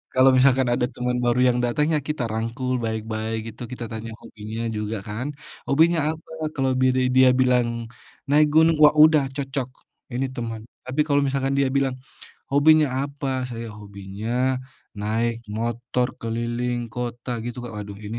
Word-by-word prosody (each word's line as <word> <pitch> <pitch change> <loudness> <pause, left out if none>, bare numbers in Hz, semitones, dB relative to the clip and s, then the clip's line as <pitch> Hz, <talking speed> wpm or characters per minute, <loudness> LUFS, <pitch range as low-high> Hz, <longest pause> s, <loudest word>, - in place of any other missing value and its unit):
Kalau, 130 +1 +6
misalkan 130 0 +4
ada 120 0 +1
teman 125 0 -1
baru 120 +1 +2
yang 125 0 +2
datang, 150 +5 +1
ya 150 - +3
kita 150 -5 -1
rangkul 115 +3 -2
baik-baik 110 0 -3
gitu, 115 - -18
kita 120 -2 -5
tanya 110 0 -5
hobinya 110 +2 -7 0.2
juga 105 +1 -3
kan, 110 +6 -4 0.4
"Hobinya 165 +4 +4
apa?" 160 0 -11 0.2
kalau 135 -1 +1
bi 130 - +5
di 130 - +2
dia 130 0 +7
bilang, 125 -2 +3 0.6
"Naik 150 +1 +5
gunung." 160 +1 +6
wah, 150 0 +7
udah 155 -2 +6
cocok, 135 -2 -3 0.5
ini 130 +2 0
teman. 115 -2 -4 0.3
Tapi, 135 +4 +1
kalau 145 -1 +3
misalkan 135 0 0
dia 140 - +3
bilang, 135 -2 +1 0.6
"Hobinya 155 +2 +6 0.2
apa?" 140 0 -4 0.2
"Saya, 115 -1 -5
hobinya 100 +1 -7 0.7
naik 115 +3 0 0.2
motor 120 +2 -1
keliling 120 +2 -2
kota." 120 +1 -5
gitu 120 +1 -5
Kak, 120 - -7
waduh, 105 -1 -6
ini 115 +3 -4
125 Hz, 160 wpm, -23 LUFS, 115-135 Hz, 0.7 s, dia